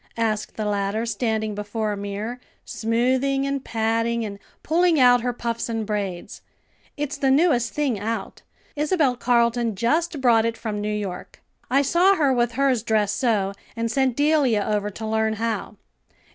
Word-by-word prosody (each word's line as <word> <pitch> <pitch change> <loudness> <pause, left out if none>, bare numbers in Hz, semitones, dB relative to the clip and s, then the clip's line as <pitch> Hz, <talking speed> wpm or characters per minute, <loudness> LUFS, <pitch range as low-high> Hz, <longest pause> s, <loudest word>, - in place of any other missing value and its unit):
asked 220 -2 -1
the 215 - -3
latter, 205 +2 -1
standing 220 -1 -1
before 210 +1 -3
a - - -2
mirror, 205 +4 -5 0.3
smoothing 260 +4 0
and 275 -1 -2
patting, 230 +1 0
and 200 -1 -7 0.2
pulling 335 0 +3
out 245 -1 +6
her 245 +1 -1
puffs 235 -1 -3
and 225 -1 -2
braids. 200 -4 -4 0.6
"It's 290 -1 -3
the 275 -1 +1
newest 265 -5 +3
thing 275 -8 -1
out. 225 +3 -4 0.3
Isabel 300 -3 +1
Carleton 235 -2 +1
just 305 - 0
brought 235 -4 +4
it 230 0 -1
from 210 -2 -4
New 210 - -2
York. 200 -4 -5 0.3
I 275 +3 +3
saw 355 +7 +4
her 285 -6 +2
with 240 -1 +1
hers 265 -2 +2
dressed 215 -2 0
so, 210 -6 +1 0.2
and 230 0 -2
sent 265 -2 +1
Delia 285 -8 +2
over 210 -1 0
to 215 +2 -7
learn 220 0 0
how." 220 0 -3
230 Hz, 160 wpm, -23 LUFS, 215-265 Hz, 0.6 s, out